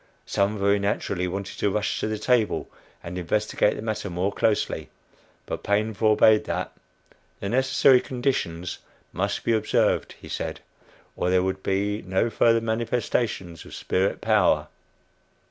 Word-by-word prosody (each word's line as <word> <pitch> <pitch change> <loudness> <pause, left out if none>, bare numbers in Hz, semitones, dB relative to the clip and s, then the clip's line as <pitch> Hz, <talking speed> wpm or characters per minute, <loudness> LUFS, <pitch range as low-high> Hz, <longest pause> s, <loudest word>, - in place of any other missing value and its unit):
Some 100 +2 0
very 100 +1 +2
naturally 100 -2 -1
wanted 95 +2 -5
to 100 - +2
rush 105 +1 -1
to - - -1
the 110 0 -2
table 115 0 +1 0.4
and 90 +2 -5
investigate 105 +4 +1
the - - -6
matter 110 -2 -3
more 90 +3 -1
closely, 110 -2 0 0.6
but - - -5
Paine 105 +2 0
forbade 110 +1 +4
that - - -3 0.7
the 100 - -3
necessary 130 +1 +4
"conditions" 110 -10 -2 0.3
must - - -2
be 115 - +2
observed, 110 - +1
he - - -12
said, - - -4 0.6
or 90 - -1
there 90 0 +3
would 95 0 -2
be 100 +2 -1
no 95 +5 0
further 115 0 +3
manifestation 115 -4 -1
of 85 - -11
spirit 95 +2 -1
power. 90 -9 +3
105 Hz, 145 wpm, -25 LUFS, 95-110 Hz, 0.7 s, forbade